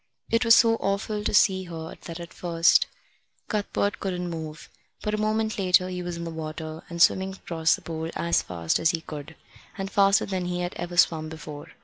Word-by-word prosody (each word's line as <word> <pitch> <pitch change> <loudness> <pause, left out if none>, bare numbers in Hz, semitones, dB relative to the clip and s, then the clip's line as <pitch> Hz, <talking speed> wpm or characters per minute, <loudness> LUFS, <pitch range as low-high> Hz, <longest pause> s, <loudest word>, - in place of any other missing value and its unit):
It 230 +1 +3
was 230 -1 +7
so 225 -1 +5
awful 205 +1 -1
to - - 0
see 190 -1 +4
her 165 -2 -7
that 165 0 -6
at 170 0 -9
first 170 -1 +3 0.6
Cuthbert 205 -1 -1
couldn't 180 -2 -3
move; 160 -1 -7 0.4
but 210 - -1
a - - +1
moment 215 0 0
later 185 -1 +3
he 180 -1 -4
was 175 -1 -4
in 170 - -5
the 165 - -4
water 160 0 -6
and 170 -1 -6
swimming 190 +2 +4
across 165 -3 +1
the - - -14
pool 160 -1 -4
as 170 0 +2
fast 85 -2 -1
as 165 - +3
he 165 -2 -1
could, 155 0 -8 0.4
and 195 0 -4
faster 195 0 +4
than 185 -2 -2
he 180 0 -2
had 175 0 -3
ever 175 0 -6
swum 160 -3 +3
before. 155 -2 -8
175 Hz, 205 wpm, -26 LUFS, 160-195 Hz, 0.6 s, was